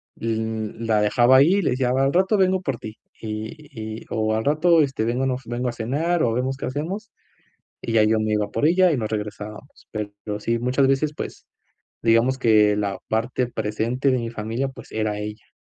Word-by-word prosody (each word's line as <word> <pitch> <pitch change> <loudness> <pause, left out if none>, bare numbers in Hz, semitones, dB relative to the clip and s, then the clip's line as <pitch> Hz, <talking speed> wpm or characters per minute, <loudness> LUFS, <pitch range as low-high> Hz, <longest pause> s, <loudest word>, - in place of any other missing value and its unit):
l 110 -1 -3
la 110 -2 +2
dejaba 120 +4 +5
ahí 160 +8 +6
y 200 - +2
le - - +1
decía: 125 0 0
"Al 135 +1 +2
rato 190 +4 +3
vengo 190 -1 +2
por 135 -8 -2
ti". 110 -1 -9 0.2
Y 110 +1 -6
y - - -23
o: 110 0 0
"Al 110 - -2
rato, 160 +3 +4
este, 135 -6 0
vengo 125 +3 0
no 130 -1 +1
f 130 -2 -10
vengo 125 +1 -1
a - - -2
cenar 145 +9 0
o 115 - +2
vemos 130 +3 -1
qué - - -5
hacemos". 175 - -4 0.7
Y 115 - -3
ya 110 - +5
yo 110 +1 +3
me 110 0 0
iba 105 -1 0
por - - 0
ella 180 +1 +4
y 150 - +1
nos 110 -3 -2
regresábamos. 105 +4 -6
Pero 105 -1 -5
sí, 115 +2 0
muchas 125 +3 +2
veces, 140 +3 +1
pues, - - -7 0.6
digamos 115 +3 +3
que 105 -4 +4
la 100 -2 -2
parte 120 +3 0
presente 120 +4 -1
de 130 - +2
mi 115 -1 -3
familia, 115 +4 -3
pues 130 - -12
era 110 -1 -1
ella. 105 +1 -7
120 Hz, 205 wpm, -23 LUFS, 110-135 Hz, 0.7 s, ahí